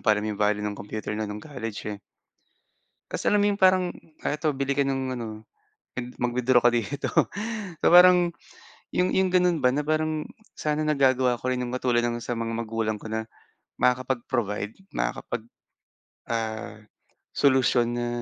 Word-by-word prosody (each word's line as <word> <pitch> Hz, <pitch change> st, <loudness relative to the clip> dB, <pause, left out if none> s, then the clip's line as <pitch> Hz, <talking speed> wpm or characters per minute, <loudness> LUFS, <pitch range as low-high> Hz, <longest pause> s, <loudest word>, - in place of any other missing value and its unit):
pa 110 Hz, -2 st, +4 dB
alam 105 Hz, -, -2 dB
'yong 105 Hz, -1 st, -4 dB
value 105 Hz, 0 st, +2 dB
ng 105 Hz, -1 st, -3 dB
computer 105 Hz, +1 st, -5 dB
na 110 Hz, -1 st, -3 dB
no'ng 105 Hz, 0 st, -6 dB
college, 115 Hz, -8 st, -6 dB
eh. 100 Hz, -, -9 dB, 1.1 s
Kasi -, -, -4 dB
alam 210 Hz, 0 st, +4 dB
mo 205 Hz, -, +4 dB
'yong 200 Hz, -, -1 dB
parang, 185 Hz, -2 st, +4 dB, 0.3 s
"Ah, 150 Hz, -, -1 dB
eto 155 Hz, 0 st, 0 dB
bili 140 Hz, 0 st, -1 dB
ka 140 Hz, -, +3 dB
ng 130 Hz, -1 st, -2 dB
ano, 110 Hz, -2 st, -6 dB, 0.5 s
mag 125 Hz, -, -3 dB
mag-withdraw 125 Hz, +1 st, +3 dB
ka 120 Hz, -, +4 dB
dito." 120 Hz, +5 st, -2 dB, 0.7 s
So, -, -, +2 dB
parang 180 Hz, -1 st, +7 dB, 0.6 s
'yong 180 Hz, 0 st, +2 dB
'yong 190 Hz, 0 st, +3 dB
gano'n 180 Hz, -2 st, +3 dB
ba 125 Hz, -, +4 dB
na 150 Hz, -, 0 dB
parang, 155 Hz, 0 st, 0 dB, 0.3 s
sana 150 Hz, 0 st, -1 dB
nagagawa 130 Hz, -4 st, +3 dB
ko 130 Hz, +2 st, -3 dB
rin 130 Hz, -, -1 dB
'yong 125 Hz, 0 st, -3 dB
katulad 125 Hz, -2 st, +2 dB
ng 120 Hz, 0 st, -3 dB
sa 120 Hz, -2 st, -3 dB
mga 115 Hz, 0 st, -2 dB
magulang 115 Hz, -1 st, -2 dB
ko 110 Hz, +1 st, -9 dB
na, 110 Hz, 0 st, -2 dB, 0.5 s
makakapag-provide, 120 Hz, -5 st, 0 dB, 0.2 s
makakapag, 110 Hz, -, -3 dB, 0.8 s
ah, 110 Hz, -1 st, -3 dB, 0.6 s
solusyon, 130 Hz, -3 st, +3 dB
na 120 Hz, 0 st, -1 dB
125 Hz, 165 wpm, -26 LUFS, 110-145 Hz, 1.1 s, parang